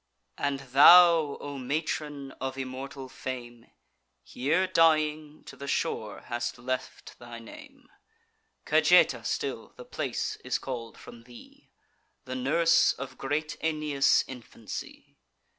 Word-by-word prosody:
And 140 Hz, -1 st, -1 dB
thou, 155 Hz, +3 st, +6 dB
O 145 Hz, -1 st, -6 dB
matron 145 Hz, 0 st, -3 dB
of 135 Hz, 0 st, -4 dB
immortal 135 Hz, +1 st, -6 dB
fame, 120 Hz, -2 st, -8 dB, 0.6 s
Here 150 Hz, +9 st, 0 dB
dying, 155 Hz, -3 st, +1 dB
to -, -, -11 dB
the 140 Hz, -, -9 dB
shore 110 Hz, -6 st, -2 dB
hast 120 Hz, 0 st, -4 dB
left 130 Hz, +1 st, -6 dB
thy 120 Hz, -1 st, -10 dB
name; 280 Hz, -, -14 dB, 0.8 s
Cajeta -, -, +4 dB
still -, -, -4 dB
the 485 Hz, -, -11 dB
place 445 Hz, -3 st, -3 dB
is -, -, -1 dB
call'd 120 Hz, -4 st, -7 dB
from 115 Hz, -1 st, -13 dB
thee, 120 Hz, -1 st, -16 dB, 0.6 s
The 130 Hz, -, -6 dB
nurse 165 Hz, +6 st, +3 dB
of 135 Hz, 0 st, -9 dB
great 150 Hz, +3 st, -2 dB
Aeneas' 150 Hz, -3 st, +2 dB
infancy. 120 Hz, -3 st, -9 dB
140 Hz, 115 wpm, -28 LUFS, 125-155 Hz, 0.8 s, thou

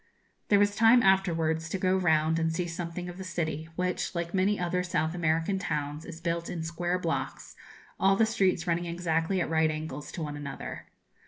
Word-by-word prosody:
There 205 Hz, -, +5 dB
was 205 Hz, 0 st, +3 dB
time 230 Hz, +2 st, +6 dB
afterwards 165 Hz, -4 st, +2 dB
to 195 Hz, -, -1 dB
go 185 Hz, 0 st, +2 dB
round 160 Hz, -3 st, +2 dB
and 165 Hz, 0 st, +1 dB
see 175 Hz, +2 st, -1 dB
something 170 Hz, +1 st, -5 dB
of 180 Hz, +1 st, -8 dB
the -, -, -5 dB
city, 160 Hz, -3 st, -3 dB
which, 180 Hz, +1 st, -2 dB
like 170 Hz, 0 st, -3 dB
many 195 Hz, +2 st, +2 dB
other 180 Hz, +1 st, 0 dB
South 165 Hz, -3 st, -1 dB
American 165 Hz, +2 st, 0 dB
towns, 150 Hz, -4 st, -3 dB
is 165 Hz, -1 st, -8 dB
built 170 Hz, 0 st, -2 dB
in 165 Hz, -2 st, -4 dB
square 175 Hz, +2 st, -1 dB
blocks, 140 Hz, -7 st, -3 dB, 0.4 s
all 195 Hz, +1 st, +4 dB
the 225 Hz, -, +4 dB
streets 195 Hz, -6 st, +1 dB
running 175 Hz, 0 st, 0 dB
exactly 170 Hz, +1 st, 0 dB
at -, -, 0 dB
right 160 Hz, 0 st, +3 dB
angles 155 Hz, -2 st, -5 dB
one 155 Hz, -3 st, -3 dB
to 145 Hz, -, -6 dB
another. 140 Hz, -1 st, -7 dB
170 Hz, 190 wpm, -29 LUFS, 160-185 Hz, 0.4 s, time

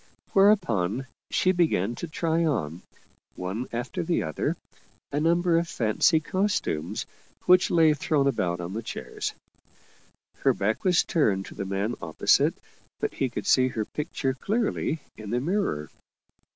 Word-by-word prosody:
Whereupon 135 Hz, -, +3 dB, 0.2 s
she 185 Hz, -, +3 dB
began 155 Hz, -, +1 dB
to 175 Hz, -, -4 dB
try 165 Hz, +1 st, 0 dB
on, 90 Hz, -, -1 dB, 0.5 s
one 95 Hz, +7 st, -4 dB
after 120 Hz, +2 st, -3 dB
the 170 Hz, +1 st, 0 dB
other, 80 Hz, -2 st, -2 dB, 0.5 s
a 145 Hz, -, 0 dB
number 170 Hz, +1 st, +3 dB
of 170 Hz, -, -2 dB
fancy 125 Hz, -, +2 dB
costumes 185 Hz, -, -1 dB, 0.4 s
which 180 Hz, 0 st, +5 dB
lay 160 Hz, -2 st, +5 dB
thrown 145 Hz, -1 st, +1 dB
about 90 Hz, -10 st, 0 dB
on 90 Hz, +2 st, -5 dB
the 110 Hz, -, -3 dB
chairs. 115 Hz, -, -5 dB, 1.0 s
Her -, -, +2 dB
back 110 Hz, +3 st, -1 dB
was 180 Hz, -2 st, +4 dB
turned 100 Hz, -, +1 dB
to -, -, -10 dB
the 100 Hz, -, -5 dB
man 100 Hz, +4 st, -1 dB
opposite, 80 Hz, -2 st, +2 dB, 0.4 s
but -, -, -2 dB
he 135 Hz, -, -1 dB
could 120 Hz, -, -5 dB
see 130 Hz, -1 st, +4 dB
her 110 Hz, -4 st, -2 dB
pic 150 Hz, +8 st, -5 dB
ture 135 Hz, -1 st, -1 dB
clearly 200 Hz, -, -1 dB, 0.2 s
in 105 Hz, -1 st, -8 dB
the 120 Hz, +3 st, +1 dB
mirror. 155 Hz, -, -1 dB
135 Hz, 150 wpm, -26 LUFS, 100-170 Hz, 1.0 s, which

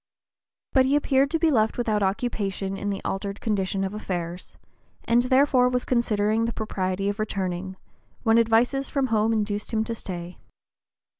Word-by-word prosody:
But 260 Hz, -1 st, +4 dB
he 280 Hz, -, +3 dB
appeared 275 Hz, -1 st, +2 dB
to 325 Hz, -, 0 dB
be 325 Hz, -1 st, +2 dB
left 220 Hz, -4 st, +2 dB
without 220 Hz, -4 st, 0 dB
occupation 195 Hz, -1 st, -1 dB
in 205 Hz, +1 st, -3 dB
the 195 Hz, -1 st, -4 dB
altered 200 Hz, +1 st, -3 dB
condition 195 Hz, -3 st, -1 dB
of 190 Hz, +1 st, -3 dB
affairs, 180 Hz, -4 st, -5 dB, 0.5 s
and 235 Hz, +1 st, +3 dB
(p. 250 Hz, -, -3 dB
021) -, -, -9 dB
therefore 260 Hz, -2 st, +4 dB
was 250 Hz, 0 st, -1 dB
considering 220 Hz, -2 st, +1 dB
the 230 Hz, -, -1 dB
propriety 195 Hz, -2 st, -2 dB
of 205 Hz, +1 st, -2 dB
returning, 190 Hz, -3 st, -3 dB, 0.5 s
when 225 Hz, -1 st, +4 dB
advices 235 Hz, +4 st, +2 dB
from 275 Hz, -2 st, 0 dB
home 215 Hz, +1 st, +3 dB
induced 210 Hz, -1 st, -2 dB
him 220 Hz, -1 st, +1 dB
to 230 Hz, -, -3 dB
stay. 180 Hz, -5 st, -7 dB
215 Hz, 170 wpm, -25 LUFS, 195-245 Hz, 0.5 s, But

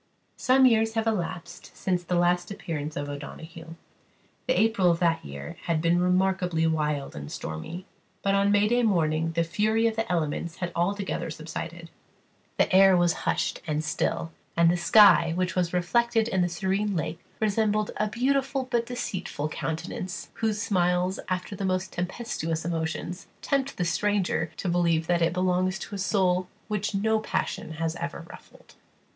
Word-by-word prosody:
Some 260 Hz, +1 st, +4 dB
years 225 Hz, -2 st, +4 dB
have 225 Hz, 0 st, +1 dB
elapsed 185 Hz, -6 st, -3 dB
since 180 Hz, -2 st, -1 dB
the 175 Hz, +1 st, -1 dB
last 175 Hz, 0 st, +2 dB
appearance 155 Hz, -6 st, -5 dB
of 145 Hz, -, -3 dB
O'Donoghue. 160 Hz, +3 st, -8 dB, 0.7 s
The 255 Hz, -, +2 dB
April 215 Hz, -4 st, +3 dB
of 170 Hz, -, +3 dB
that 170 Hz, -1 st, +1 dB
year 70 Hz, 0 st, -8 dB
had 165 Hz, -2 st, +1 dB
been 170 Hz, +2 st, +2 dB
remarkably 180 Hz, -2 st, +2 dB
wild 150 Hz, -3 st, -1 dB
and 70 Hz, 0 st, -7 dB
stormy; 160 Hz, -, -6 dB, 0.4 s
but 195 Hz, -, +2 dB
on 200 Hz, 0 st, +3 dB
May 210 Hz, +4 st, +3 dB
morning 165 Hz, -6 st, +1 dB
the 170 Hz, +1 st, +2 dB
fury 215 Hz, +6 st, +1 dB
of 225 Hz, -1 st, +1 dB
the 225 Hz, -4 st, -2 dB
elements 165 Hz, 0 st, -1 dB
had 175 Hz, -1 st, -4 dB
altogether 195 Hz, +1 st, -1 dB
subsided. 165 Hz, +1 st, -7 dB, 0.7 s
The -, -, +2 dB
air 190 Hz, -1 st, +7 dB
was 175 Hz, -1 st, +3 dB, 0.2 s
hushed -, -, -1 dB
and 155 Hz, 0 st, -1 dB
still; 165 Hz, +2 st, -1 dB, 0.3 s
and 170 Hz, 0 st, +5 dB
the -, -, +1 dB
sky, 175 Hz, -2 st, +6 dB
which 185 Hz, 0 st, -1 dB
was 175 Hz, -2 st, +1 dB
reflected 225 Hz, +6 st, +2 dB
in 190 Hz, -5 st, +1 dB
the 175 Hz, -, +1 dB
serene 195 Hz, +3 st, -1 dB
lake, 160 Hz, 0 st, -3 dB, 0.2 s
resembled 215 Hz, 0 st, +1 dB
a 215 Hz, -, +1 dB
beautiful 270 Hz, +4 st, 0 dB
but 235 Hz, -1 st, +1 dB
deceitful 190 Hz, -10 st, -4 dB
countenance, 170 Hz, +3 st, -4 dB
whose 220 Hz, -2 st, -1 dB
smiles, 180 Hz, -3 st, +1 dB
after 185 Hz, +2 st, -3 dB
the 195 Hz, -, -5 dB
most 185 Hz, 0 st, -1 dB
tempestuous 175 Hz, -4 st, -3 dB
emotions, 165 Hz, +2 st, -3 dB, 0.2 s
tempt 275 Hz, -2 st, 0 dB
the 180 Hz, -, 0 dB
stranger 185 Hz, -2 st, 0 dB
to -, -, -4 dB
believe 170 Hz, -2 st, +2 dB
that 175 Hz, 0 st, +1 dB
it 165 Hz, -, +3 dB
belongs 185 Hz, +1 st, +1 dB
to 200 Hz, -, -8 dB
a 200 Hz, -, -4 dB
soul 185 Hz, -2 st, +1 dB, 0.2 s
which 210 Hz, 0 st, -1 dB
no 220 Hz, +2 st, +2 dB
passion 185 Hz, -6 st, -3 dB
has 165 Hz, +1 st, -2 dB
ever 165 Hz, 0 st, -5 dB
ruffled. -, -, -16 dB
180 Hz, 165 wpm, -27 LUFS, 165-205 Hz, 0.7 s, air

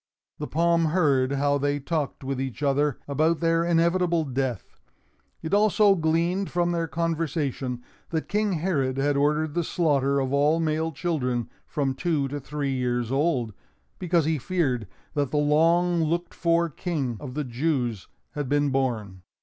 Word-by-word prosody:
The 150 Hz, -, -4 dB
palm 170 Hz, +1 st, +2 dB
heard 145 Hz, -6 st, +2 dB
how 140 Hz, +1 st, +1 dB
they 145 Hz, +1 st, 0 dB
talked 150 Hz, -1 st, -3 dB
with 135 Hz, 0 st, -3 dB
each 135 Hz, +2 st, -5 dB
other 145 Hz, 0 st, +1 dB
about 155 Hz, +4 st, +1 dB
their 165 Hz, 0 st, +2 dB
inevitable 170 Hz, 0 st, +2 dB
death. 130 Hz, -3 st, -3 dB, 0.6 s
It 160 Hz, +3 st, -4 dB
also 210 Hz, 0 st, +5 dB
gleaned 170 Hz, +3 st, 0 dB
from 175 Hz, 0 st, 0 dB
their 165 Hz, -1 st, -1 dB
conversation 150 Hz, -6 st, -2 dB, 0.3 s
that 160 Hz, -1 st, -2 dB
King 210 Hz, -1 st, 0 dB
Herod 150 Hz, -6 st, 0 dB
had 145 Hz, +1 st, +1 dB
ordered 150 Hz, +2 st, +1 dB
the 175 Hz, -, 0 dB
slaughter 140 Hz, -5 st, +1 dB
of 135 Hz, 0 st, -1 dB
all 150 Hz, +3 st, +3 dB
male 160 Hz, 0 st, 0 dB
children 130 Hz, -7 st, -2 dB, 0.2 s
from 140 Hz, -3 st, -1 dB
two 150 Hz, -1 st, 0 dB
to 145 Hz, +2 st, -4 dB
three 140 Hz, 0 st, -3 dB
years 125 Hz, -2 st, -1 dB
old, 135 Hz, -6 st, 0 dB, 0.5 s
because 175 Hz, -3 st, +1 dB
he 160 Hz, -1 st, 0 dB
feared 130 Hz, -, -1 dB, 0.3 s
that 145 Hz, -3 st, 0 dB
the 150 Hz, -, -1 dB
long 165 Hz, +4 st, +3 dB
looked 170 Hz, +2 st, -1 dB
for 170 Hz, -1 st, +2 dB
King 150 Hz, -6 st, -3 dB
of 130 Hz, -3 st, -8 dB
the 150 Hz, -, -1 dB
Jews 125 Hz, -, -2 dB, 0.2 s
had 145 Hz, -3 st, -4 dB
been 145 Hz, -1 st, +2 dB
born. 115 Hz, -8 st, -2 dB
150 Hz, 160 wpm, -25 LUFS, 135-170 Hz, 0.6 s, also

